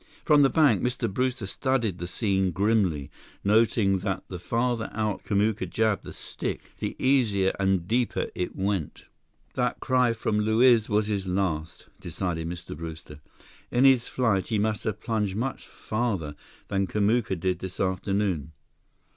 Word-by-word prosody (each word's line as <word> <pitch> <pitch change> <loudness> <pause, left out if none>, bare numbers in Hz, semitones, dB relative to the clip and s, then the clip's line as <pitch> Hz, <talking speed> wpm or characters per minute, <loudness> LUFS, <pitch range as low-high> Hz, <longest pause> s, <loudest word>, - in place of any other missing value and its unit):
From 150 -2 +6
the 135 - +5
bank, 150 +2 +4
Mr. 125 -1 -1
Brewster 125 +2 -1
studied 115 -3 -1
the 85 - -4
scene 95 -1 0
grimly, 95 -6 +1 0.3
noting 105 -2 +3
that 95 -1 -3
the 90 - -6
farther 115 +3 -1
out 110 -3 -2
Kamuka 105 +2 0
jabbed 110 -3 0
the - - -7
stick, - - -6
the - - -3
easier 110 -8 +2
and 95 -3 +1
deeper 120 +2 0
it 90 - -3
went. 95 -4 -2 0.5
"That - - -1
cry 125 -2 +2
from 110 -1 -1
Luiz 110 +1 +4
was 105 0 +2
his 100 -3 -2
last," 90 -3 -2
decided 85 -1 -3
Mr. 85 -3 -7
Brewster. 80 -2 -8 0.5
"In 125 +2 +3
his 130 -3 +5
flight, 110 -8 +1
he 110 - 0
must 110 +1 -1
have 110 -3 -2
plunged 105 -5 -1
much 125 +5 -3
farther 105 -10 -2 0.3
than 95 -1 0
Kamuka 105 +1 +1
did 90 +1 -1
this 95 -1 -7
afternoon. 95 -4 -1
105 Hz, 150 wpm, -26 LUFS, 95-115 Hz, 0.5 s, From